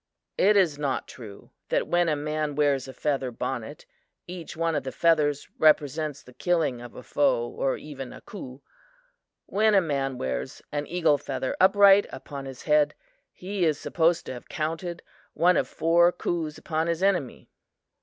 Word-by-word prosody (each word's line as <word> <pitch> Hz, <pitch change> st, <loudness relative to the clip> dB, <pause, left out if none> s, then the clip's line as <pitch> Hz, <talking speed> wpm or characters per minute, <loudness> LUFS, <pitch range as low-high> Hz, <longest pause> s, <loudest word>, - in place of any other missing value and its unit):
"It 205 Hz, +2 st, +5 dB
is 165 Hz, -7 st, +2 dB
not 140 Hz, -3 st, -2 dB
true 105 Hz, -5 st, -12 dB, 0.2 s
that -, -, +1 dB
when 175 Hz, -1 st, +2 dB
a 155 Hz, -, +2 dB
man 150 Hz, 0 st, -2 dB
wears 140 Hz, -3 st, +1 dB
a 130 Hz, -, -8 dB
feather 135 Hz, -2 st, -1 dB
bonnet, 125 Hz, +3 st, -5 dB, 0.4 s
each 175 Hz, -3 st, -8 dB
one 165 Hz, 0 st, 0 dB
of 145 Hz, -, 0 dB
the 130 Hz, 0 st, -5 dB
feathers 150 Hz, -3 st, +2 dB
represents 150 Hz, -1 st, +2 dB
the 125 Hz, -, -16 dB
killing 160 Hz, -7 st, 0 dB
of 120 Hz, -1 st, -11 dB
a 125 Hz, -, -9 dB
foe 120 Hz, -5 st, +1 dB
or 135 Hz, +2 st, -1 dB
even 135 Hz, -4 st, -8 dB
a -, -, -10 dB
coup. 135 Hz, -, -10 dB, 0.8 s
When 215 Hz, +1 st, +2 dB
a -, -, +7 dB
man 135 Hz, -6 st, -2 dB
wears 65 Hz, -, -4 dB
an 145 Hz, 0 st, -3 dB
eagle 165 Hz, -4 st, +2 dB
feather 130 Hz, -2 st, -3 dB
upright 200 Hz, +1 st, +6 dB
upon 135 Hz, +1 st, -8 dB
his 135 Hz, -2 st, -9 dB
head, 150 Hz, -1 st, +3 dB, 0.4 s
he 190 Hz, 0 st, -4 dB
is 155 Hz, -3 st, +2 dB
supposed 170 Hz, 0 st, +1 dB
to -, -, -5 dB
have 125 Hz, -, -11 dB
counted 165 Hz, +2 st, -4 dB, 0.3 s
one 180 Hz, +1 st, +4 dB
of -, -, +1 dB
four 170 Hz, +2 st, +3 dB
coups 165 Hz, -3 st, -3 dB
upon 160 Hz, 0 st, -2 dB
his 170 Hz, +2 st, -1 dB
enemy." 180 Hz, -10 st, 0 dB
150 Hz, 170 wpm, -26 LUFS, 135-170 Hz, 0.8 s, a